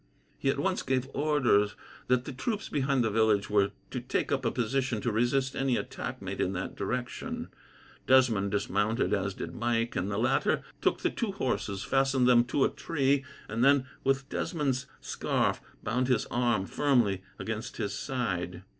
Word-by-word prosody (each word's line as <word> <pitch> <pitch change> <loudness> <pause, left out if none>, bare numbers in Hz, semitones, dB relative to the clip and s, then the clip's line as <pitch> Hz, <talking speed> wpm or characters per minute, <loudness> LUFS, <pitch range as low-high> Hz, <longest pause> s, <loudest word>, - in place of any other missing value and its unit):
He - - +1
at - - +1
once - - 0
gave 130 0 0
orders 130 -9 +2 0.3
that 125 0 +2
the - - -5
troops 210 - -3
behind 135 -3 +1
the 110 - +1
village 105 -2 +2
were 100 -1 +4 0.2
to 130 - -2
take 125 - -1
up 135 -1 +1
a - - +4
position 125 0 0
to 120 - 0
resist 125 +4 +1
any 135 -2 +1
attack - - -5
made - - -3
in 95 - 0
that 95 0 -4
direction. 125 -1 -3 0.6
Desmond 120 -7 +4
dismounted, 105 +3 0
as 95 -1 0
did - - -6
Mike, 120 0 0
and 95 +3 -1
the 100 - -2
latter 115 - +2 0.2
took - - +1
the - - +1
two - - -2
horses, 100 +1 -2
fastened 135 -1 +2
them 120 -1 +6
to 135 +2 +2
a - - +2
tree, 140 -3 0 0.2
and 115 +3 -1
then, 140 -1 +5 0.2
with 135 0 +1
Desmond's 140 -6 -1
scarf, - - 0 0.2
bound 125 +4 0
his 125 -4 +2
arm 120 -5 +1
firmly 120 -8 +2 0.2
against 110 0 -5
his 105 -3 -2
side. 90 -8 -3
120 Hz, 170 wpm, -29 LUFS, 105-135 Hz, 0.6 s, them